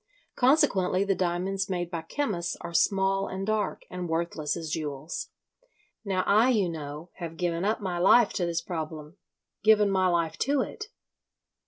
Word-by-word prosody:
Consequently 245 - +3
the 200 0 +1
diamonds 190 +2 -1
made 175 -2 -2
by 170 -2 -3
chemists 175 - -2
are 170 - -7
small 195 +2 +2
and 190 +1 -4
dark, 215 0 -1
and 180 -1 -5
worthless 165 -2 -1
as 160 -2 -5
jewels. 150 0 -4 0.7
Now 190 -3 0
I, 220 +5 +5
you 210 -8 +2
know, 155 +1 -7
have 165 -3 -6
given 170 -1 -1
up 215 +2 0
my 180 -3 -2
life 210 +5 +5
to 180 - 0
this 165 -1 -2
problem—given 170 +6 -1
my 190 -1 +3
life 170 -2 0
to 280 0 +2
it. 430 - -5
180 Hz, 155 wpm, -27 LUFS, 165-200 Hz, 0.7 s, I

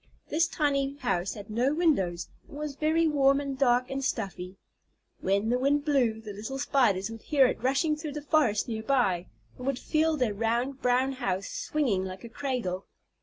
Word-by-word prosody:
This 325 +3 +2
tiny 280 -2 0
house 200 -9 -1
had 205 -1 -9
no 250 +6 +1
windows, 190 - +1 0.2
and 285 - -10
was 300 -1 -4
very 320 +3 +2
warm 275 -2 +4
and 280 -1 -3
dark 250 -2 +3
and 275 0 -2
stuffy. 195 -6 -3 0.6
When 200 +3 +1
the 245 +1 +2
wind 285 +2 +2
blew, 250 -7 +2
the 215 -2 -8
little 220 +7 -5
Spiders 225 -8 +1
would 225 -1 -9
hear 280 -3 +4
it 250 - -1
rushing 275 +5 +2
through 300 -1 -6
the 300 0 -6
forest 285 -9 +2
near 220 -2 -3
by, 220 -8 +1 0.3
and 250 - -6
would 275 -2 0
feel 315 +2 +1
their 245 -6 +1
round 235 +5 -1
brown 250 +2 +2
house 240 -7 -2
swinging 250 -12 -1
like 185 0 -7
a 235 - -8
cradle. 230 -8 -3
255 Hz, 185 wpm, -28 LUFS, 215-285 Hz, 0.6 s, warm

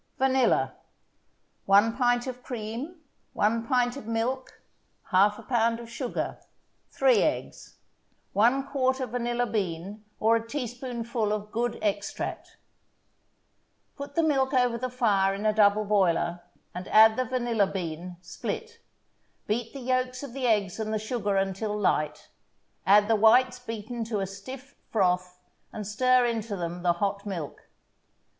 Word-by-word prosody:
VANILLA 265 -1 +2 0.9
1 205 +4 +5
pint 245 -1 +2
of 250 -1 -6
cream 245 +8 -6 0.3
1 225 +2 +1
pint 245 -1 +2
of 280 -6 -9
milk 235 +3 -2 0.5
1/2 200 +3 +3
pound 230 -2 +2
of 230 -1 -10
sugar 250 0 -3 0.5
3 - - +3
eggs - - -3 0.6
1/4 260 +3 +2
vanilla 240 0 -1
bean 200 -2 -3 0.2
or 225 +1 +4
a 230 0 -2
teaspoonful 240 -3 -3
of 210 0 -3
good 240 +1 -1
extract 205 -1 -3 1.4
Put 280 0 -8
the 330 - +3
milk 270 -3 +2
over 250 -2 +3
the 255 +2 -3
fire 205 -6 +2
in 205 +2 -5
a 215 - +3
double 210 0 +4
boiler, 175 -4 +1 0.3
and 180 +1 -6
add 220 0 +7
the 255 - +1
vanilla 240 -4 +1
bean, 175 -1 -5
split. 460 - -6 0.7
Beat 225 +2 -2
the 275 - -8
yolks 255 +1 -1
of 270 -4 -7
the 260 -2 -1
eggs 205 -4 +1
and 215 0 -2
the 215 - +1
sugar 210 -2 -1
until 195 +2 -1
light, 150 -7 0 0.6
add 205 +1 +6
the 225 - +3
whites 250 +4 +4
beaten 230 0 -5
to 220 -2 -2
a 195 - -1
stiff 255 +9 -10 0.2
froth, 180 -3 0 0.3
and 210 - -6
stir 255 +4 +3
into 225 -3 -2
them 175 -1 -4
the 175 -1 +3
hot 200 +3 -2
milk. 170 -7 -6
225 Hz, 140 wpm, -27 LUFS, 200-250 Hz, 1.4 s, add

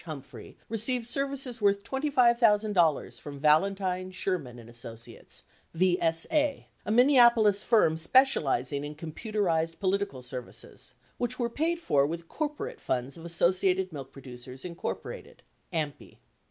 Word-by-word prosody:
Humphrey 150 -5 -10
received 230 +2 -1
services 270 -2 -1
worth 200 -1 +2
$25,000 230 - +2
from 145 -1 -8
Valentine, 185 +4 +1
Sherman 180 -9 -3
and 115 -1 -12
Associ 115 -1 -10
ates - - -11 0.3
(VSA), 185 - +1 0.2
a - - 0
Minneapolis 235 -5 +5
firm 210 -9 +3
specializing 150 - +2
in 150 +1 -6
computerized 165 0 -2
politi 200 +1 0
cal 130 -2 -11
services, 125 0 -9 0.2
which 245 +1 -2
were 235 -2 -1
paid 330 +6 -1
for 140 - +2
with 165 +2 -6
corporate 320 - -4
funds 125 +2 -2
of 165 0 -11
Associated 185 +2 +1
Milk 135 -3 -8
Producers, 130 -1 -10
Inc. 180 - -6 0.4
(AMPI). 155 -4 -4
185 Hz, 125 wpm, -28 LUFS, 150-235 Hz, 0.4 s, Minneapolis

